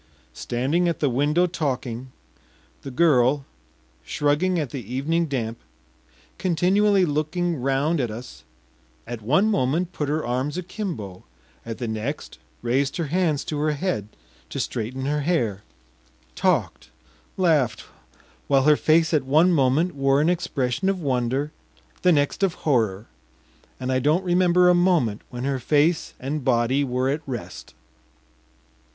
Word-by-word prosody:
Standing 145 +9 0
at 170 - -3
the 145 -4 +1
window 150 +7 +2
talking, 130 -7 -3 0.7
the 140 - -7
girl, 135 -1 +3 0.6
shrugging 150 +6 +1
at 145 -6 -3
the 135 - -5
evening 160 +6 0
damp, 115 -5 -3 0.8
continually 190 +3 +3
looking 160 +3 -1
round 135 +4 +1
at 120 - -1
us, 110 - -9 0.6
at 120 -1 -6
one 145 - +3
moment 175 +1 0
put 150 -2 -3
her 155 -1 -1
arms 130 +6 -2
akimbo, 170 - -5 0.4
at 115 -1 -6
the 120 - -4
next 110 - -5 0.2
raised 135 +3 0
her 170 - -1
hands 170 -6 +1
to 150 - -4
her 155 0 +1
head 145 - -2 0.4
to - - -5
straighten 130 +4 -3
her 150 +1 0
hair, 130 - 0 0.7
talked, - - 0 0.5
laughed, 160 - +2 0.6
while 135 -1 +3
her 150 +1 +6
face 160 +1 +3
at 155 - +4
one 155 +7 +4
moment 150 +4 +2
wore 135 0 +2
an 155 +3 +3
expression 165 -1 -1
of 195 -1 -1
wonder, 135 0 -1 0.5
the 180 - +4
next 145 +3 +1
of 190 -3 +1
horror, 110 -8 +1 0.7
and 130 0 -2
I 130 - +2
don’t 155 +8 +2
remember 180 0 +4
a 180 - +6
moment 175 - +2
when 125 0 -6
her 135 -1 -1
face 150 +5 +1
and 140 +2 -3
body 130 +2 +2
were 130 -1 -1
at 150 +2 -2
rest. 120 -5 -7
145 Hz, 140 wpm, -24 LUFS, 125-170 Hz, 0.8 s, her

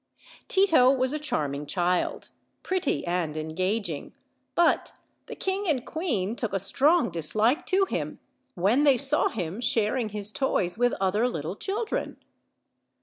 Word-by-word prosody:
Tito 335 -10 +5
was 260 0 +1
a 305 - -2
charming 145 - -2
child, 180 +2 -1 0.3
pretty 360 - -1
and 170 -3 -1
engaging, 175 +2 -3 0.4
but 345 - +2 0.3
the - - -7
king 385 +1 -2
and 265 -7 0
queen 235 - -2
took 230 -5 -3
a 195 - +1
strong 280 - +2
dislike 215 - +1
to 385 +1 +3
him - - -4 0.4
when 205 +9 +2
they 280 -3 +5
saw 280 +3 +2
him 190 0 -4
sharing 225 0 +1
his 210 0 -4
toys 200 -9 0
with 245 +2 +2
othei 205 +6 +1
little 160 +1 -4
children. 425 - -3
225 Hz, 140 wpm, -26 LUFS, 180-290 Hz, 0.4 s, Tito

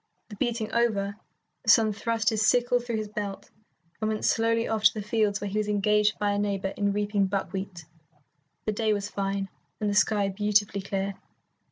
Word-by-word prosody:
The 210 - -8
beating 230 -2 -2
over, 205 -4 +1 0.5
the - - -2
son 220 -1 +6
thrust 225 0 0
his 215 -1 0
sickle 245 +2 +3
through 240 -1 -4
his 215 -1 -3
belt 205 -1 -6 0.5
and 215 - 0
went 215 -1 -2
slowly 230 0 +2
off 220 -1 -1
to - - +7
the 210 - -4
fields 210 -2 +1
where 205 - -4
he 205 +2 -1
was 210 - -1
engaged 210 +1 +2
by 205 -1 +1
a 205 - 0
neighbour 195 -1 -1
in 205 -1 +1
reaping 205 -1 +1
buckwheat. 190 -3 -4 0.8
The 215 - +1
day 215 0 +1
was 205 -1 -3
fine, 195 0 -2 0.3
and 210 - -1
the 205 - +1
sky 205 -1 +3
beautifully 205 0 +1
clear. 195 0 -3
210 Hz, 190 wpm, -27 LUFS, 200-220 Hz, 0.8 s, to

